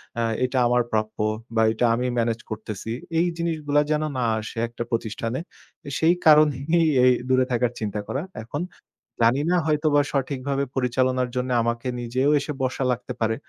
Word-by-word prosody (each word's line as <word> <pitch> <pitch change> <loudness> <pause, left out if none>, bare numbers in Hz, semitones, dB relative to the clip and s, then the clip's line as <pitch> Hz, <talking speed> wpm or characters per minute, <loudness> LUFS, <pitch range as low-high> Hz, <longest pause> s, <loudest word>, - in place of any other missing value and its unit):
অ্যা 115 - 0 0.2
এটা 130 +1 -2
আমার 120 0 +3
প্রাপ্য, 110 0 -1 0.4
বা 110 - +4
এটা 120 +2 +1
আমি 125 +2 -1
মেনেজ 115 0 0
করতেছি। 110 0 -5 0.3
এই 175 - +3
জিনিসগুলা 155 -3 +1
যেন 155 0 +1
না 125 - 0 0.2
আসে 110 - -8
একটা 120 0 -5
প্রতিষ্ঠানে। 115 +2 -2 0.6
সেই 165 +2 +4
কারণেই 155 +2 +5 0.2
এই 125 - +7 0.2
দূরে 130 0 +4
থাকার 120 0 +1
চিন্তা 105 -1 -3
করা। 135 - -2 0.2
এখন 145 +7 -4 0.6
জানি 120 +5 +4
না, - - +4
হয়তোবা 150 -1 +3
সঠিকভাবে 140 0 -1
পরিচালনার 130 0 +1
জন্যে 125 0 -1
আমাকে 115 +2 -2
নিজেও 125 +4 0
এসে 150 - -4
বসা 130 +1 -1
লাগতে 125 0 -4
পারে। 110 0 +1
125 Hz, 160 wpm, -24 LUFS, 115-145 Hz, 0.6 s, এই